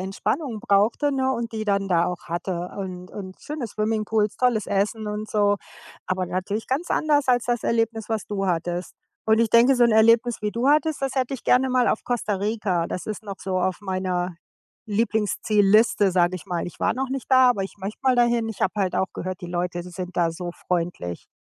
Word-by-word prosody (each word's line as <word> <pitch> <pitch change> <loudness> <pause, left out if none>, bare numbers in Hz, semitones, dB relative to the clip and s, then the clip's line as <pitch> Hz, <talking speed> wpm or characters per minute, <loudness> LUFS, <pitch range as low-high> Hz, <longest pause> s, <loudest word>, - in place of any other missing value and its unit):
Entspannung 215 - -2
brauchte, 225 +7 +2
ne, 265 -1 +1
und 235 -2 -3
die 220 -1 -3
dann 200 -1 0
da 170 -2 +3
auch 180 -1 -5
hatte 175 +1 -3
und 185 -2 -6
und 185 -2 -8
schöne 295 -4 -5
Swimmingpools, 215 0 -1
tolles 245 -4 +1
Essen 210 +2 -1
und 210 +1 -4
so. 205 -1 +3 0.5
Aber 185 0 -1
natürlich 195 +5 -3
ganz 285 +7 -2
anders 295 -2 +2
als 245 -1 +3
das 240 -2 0
Erlebnis, 225 -1 0
was 220 -2 -2
du 195 -1 -2
hattest, 175 0 -2 0.3
und 220 0 +4
ich 230 - +3
denke, 240 +4 +6
so 245 -1 +4
'n 235 - +4
Erlebnis, 230 +2 +4
wie 210 - 0
du 240 +4 0
hattest, 305 0 +2
das 270 -1 -2
hätte 260 -1 0
ich 265 - -5
gerne 260 +1 +3
mal 255 -1 +3
auf - - -1
Costa 240 -4 -1
Rica. 200 -4 -1
Das 180 - -5
ist 215 +1 -5
noch 200 -2 -7
so 185 0 -2
auf 185 0 0
meiner 185 -2 -2 0.5
Lieblingszielliste, 210 -1 +2
sage 180 0 +2
ich 175 - -11
mal. 175 -2 -2
Ich 175 - -10
war - - +2
noch 265 +2 -2
nicht 265 0 -5
da, 260 -1 +7
aber 205 -5 -1
ich 195 - -7
möchte 200 +2 -6
mal 260 -1 +4
dahin. 235 -1 +2
Ich 220 - -10
habe 190 - +1
halt 190 -3 0
auch 190 - +2
gehört, 185 0 -5
die 175 - -6
Leute 175 0 -2
sind 180 +1 -7
da 170 -1 +3
so 175 +1 -5 0.2
freundlich. 170 - -2
210 Hz, 210 wpm, -24 LUFS, 185-235 Hz, 0.5 s, da